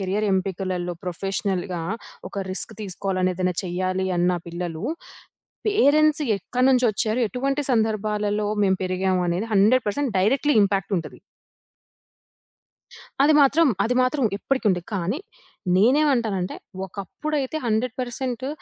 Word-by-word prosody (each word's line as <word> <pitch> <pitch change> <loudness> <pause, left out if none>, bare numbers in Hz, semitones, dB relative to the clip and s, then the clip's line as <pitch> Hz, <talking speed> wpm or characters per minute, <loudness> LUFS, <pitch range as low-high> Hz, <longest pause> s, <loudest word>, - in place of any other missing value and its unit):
Career 195 +3 -1
ఎంపికలలో, 185 -2 -2
ప్రొఫెషనల్‌గా 185 -1 -2 0.5
ఒక - - -6
risk 220 +4 -1
తీసుకోవాలని, 185 -1 -1
ఏదైనా 180 -1 -1
చేయ్యాలి 185 +1 -1
అన్న 175 +1 +3 0.2
పిల్లలు, 170 0 -5 0.8
పేరెంట్స్ 310 -6 +4 0.2
ఎక్కడి 250 +7 0
నుంచి 255 -1 +3
వచ్చారు? 215 +3 -1
ఎటువంటి 275 +4 -1
సందర్భాలలో 210 -2 0 0.2
మేము 190 -1 +3
పెరిగామనేది 185 +1 0
100% 225 +5 +2
డైరెక్ట్‌లీ 270 +9 +2
ఇంపాక్ట్ 195 0 0
ఉంటది. 165 - -8 2.0
అది 295 +3 +5
మాత్రం, 295 +3 +5 0.2
అది 240 - +1
మాత్రం 255 +2 +1
ఇప్పటికీ 260 +3 -2
ఉంది. 180 -2 +1
కానీ 195 - -1 0.6
నేనేమంటానంటే, 235 -4 +2 0.3
ఒకప్పుడైతే 270 - -4
100% 250 +2 -2
205 Hz, 105 wpm, -23 LUFS, 185-255 Hz, 2.0 s, అది